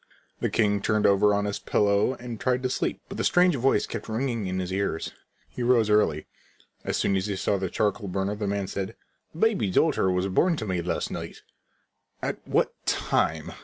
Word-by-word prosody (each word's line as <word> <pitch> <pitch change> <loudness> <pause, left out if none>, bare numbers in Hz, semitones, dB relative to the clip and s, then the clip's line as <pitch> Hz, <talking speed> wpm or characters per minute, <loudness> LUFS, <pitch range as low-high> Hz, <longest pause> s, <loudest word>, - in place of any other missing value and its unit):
The - - 0
king 105 -2 +1
turned 110 0 +1
over 100 +1 +5
on 100 0 +1
his 100 0 -2
pillow 100 +4 +2
and 120 -2 -7
tried 125 0 0
to 130 - 0
sleep, - - -1
but - - -8
the - - 0
strange 180 -2 +4
voice 135 +1 +2
kept 115 -1 -6
ringing 115 -2 -1
in 95 0 -2
his 95 0 -3
ears. 95 -4 -2 0.3
He - - -8
rose 120 -3 +3
early. 80 -8 +2 0.6
As - - -1
soon 100 - +1
as 95 +1 0
he 100 - -2
saw 100 +1 0
the 95 -1 -2
charcoal 105 +1 -1
burner 95 +2 -1
the 105 0 -3
man 100 0 -1
said: 95 0 -4 0.4
"A - - -10
baby 210 - +2
daughter 115 - +2
was 90 +1 +1
born 165 - +2
to 110 - -4
me 90 -3 -1
last 85 - -2
night." - - -7 0.8
"At - - -2
what - - +1
time?" 80 -1 0
105 Hz, 200 wpm, -26 LUFS, 95-120 Hz, 0.8 s, over